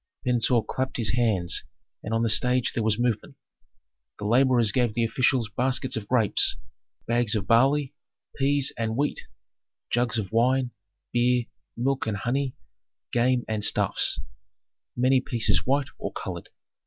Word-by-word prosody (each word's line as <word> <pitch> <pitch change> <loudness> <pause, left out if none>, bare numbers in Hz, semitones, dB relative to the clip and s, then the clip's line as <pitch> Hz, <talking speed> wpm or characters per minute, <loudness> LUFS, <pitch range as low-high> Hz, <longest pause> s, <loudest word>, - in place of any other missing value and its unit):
Pentuer 120 -1 +2
clapped 130 0 -3
his 110 -4 +1
hands 110 -8 +1 0.4
and 110 - -6
on 115 0 +1
the - - +2
stage 125 +3 +2
there 115 - -1
was 110 -1 +1
movement. 120 -2 -1 0.8
The 105 - -6
laborers 120 -1 +3
gave 120 -2 0
the 120 - +1
officials 120 +1 +1
baskets 130 +1 0
of 110 -3 -5
grapes, 115 -5 +2 0.5
bags 120 -2 +1
of 100 -3 -2
barley, 135 +6 +3 0.4
peas 140 0 +2
and 110 0 -2
wheat, 145 +1 -2 0.6
jugs 120 -1 0
of 105 -3 -3
wine, 125 +2 +2 0.4
beer, 120 0 +2 0.3
milk 130 +1 -1
and 105 -2 -1
honey, 130 +5 -2 0.6
game 120 0 +1
and 110 -2 -2
stuffs, - - +2 0.8
many 130 +1 +3
pieces 120 -2 0
white 140 0 +1
or - - -4
colored. - - -7
120 Hz, 140 wpm, -25 LUFS, 115-130 Hz, 0.8 s, laborers